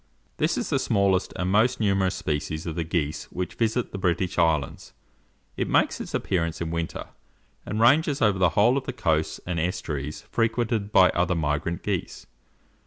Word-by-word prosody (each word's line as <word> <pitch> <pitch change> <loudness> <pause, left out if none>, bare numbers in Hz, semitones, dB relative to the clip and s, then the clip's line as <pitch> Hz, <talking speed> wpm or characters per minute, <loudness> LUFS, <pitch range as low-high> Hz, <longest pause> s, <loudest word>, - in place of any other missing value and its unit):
This - - +1
is - - -3
the - - +2
smallest 95 -2 +1
and 90 +1 -1
most 110 +5 +3
numerous 95 -3 +1
species 75 +1 -3
of 85 - -3
the 85 +1 -2
geese 75 -2 -2
which 90 0 -5
visit 115 +1 -1
the 100 - -5
British 90 0 0
islands. 80 -5 0 0.6
It - - -1
makes - - +2
its - - -5
appearance 85 -3 -1
in 80 -1 -3
winter, 85 -1 -4 0.6
and 105 - -2
ranges 145 +5 +4
over 105 -5 +2
the 90 -2 +4
whole 120 +6 +5
of 130 - -15
the 130 - -3
coasts 80 -9 0
and 85 -2 -2
estuaries 75 -4 -3
frequented 115 -2 0
by 90 -3 +6
other 90 +1 +1
migrant 80 +2 -2
geese. - - -3
90 Hz, 175 wpm, -25 LUFS, 80-110 Hz, 0.6 s, by